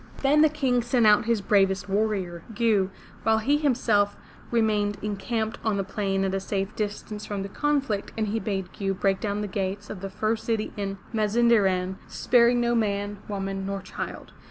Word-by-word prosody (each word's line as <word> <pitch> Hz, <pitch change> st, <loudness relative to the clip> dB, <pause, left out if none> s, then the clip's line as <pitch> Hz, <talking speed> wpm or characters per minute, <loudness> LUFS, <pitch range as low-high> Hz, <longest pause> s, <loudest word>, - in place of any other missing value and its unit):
Then 290 Hz, +2 st, +5 dB
the 310 Hz, -, +6 dB
King 265 Hz, -5 st, +1 dB
sent 240 Hz, 0 st, +2 dB
out 210 Hz, 0 st, +6 dB
his 230 Hz, -2 st, +1 dB
bravest 195 Hz, -2 st, +2 dB
warrior, 195 Hz, -4 st, -1 dB
Gew, 210 Hz, -4 st, +2 dB, 0.3 s
while 220 Hz, 0 st, +3 dB
he 275 Hz, +7 st, +2 dB
himself 230 Hz, -8 st, +2 dB, 0.3 s
remained 210 Hz, -3 st, +1 dB
encamped 220 Hz, +2 st, -2 dB
on 220 Hz, -3 st, +1 dB
the 195 Hz, -, 0 dB
plain 195 Hz, 0 st, -1 dB
at 190 Hz, -, -1 dB
a 195 Hz, -, 0 dB
safe 195 Hz, +1 st, -3 dB
distance 210 Hz, 0 st, -4 dB
from 200 Hz, -2 st, -4 dB
the 200 Hz, -, -6 dB
conflict 275 Hz, -5 st, -1 dB
and 215 Hz, -2 st, 0 dB
he 225 Hz, +2 st, 0 dB
bade 195 Hz, -4 st, -3 dB
Gew 195 Hz, -1 st, -2 dB
break 195 Hz, 0 st, +1 dB
down 205 Hz, -1 st, -2 dB
the 210 Hz, -, -2 dB
gates 200 Hz, +1 st, -3 dB
of 190 Hz, -, -7 dB
the 195 Hz, -, -4 dB
first 215 Hz, +3 st, -1 dB
city 225 Hz, -2 st, -1 dB
in 195 Hz, -1 st, -3 dB, 0.2 s
Mazinderan, 210 Hz, -4 st, +2 dB
sparing 245 Hz, 0 st, +3 dB
no 240 Hz, 0 st, +2 dB
man, 205 Hz, -2 st, -1 dB
woman 195 Hz, -1 st, -3 dB
nor 195 Hz, 0 st, -3 dB
child. 185 Hz, -, -7 dB
210 Hz, 180 wpm, -26 LUFS, 195-225 Hz, 0.3 s, the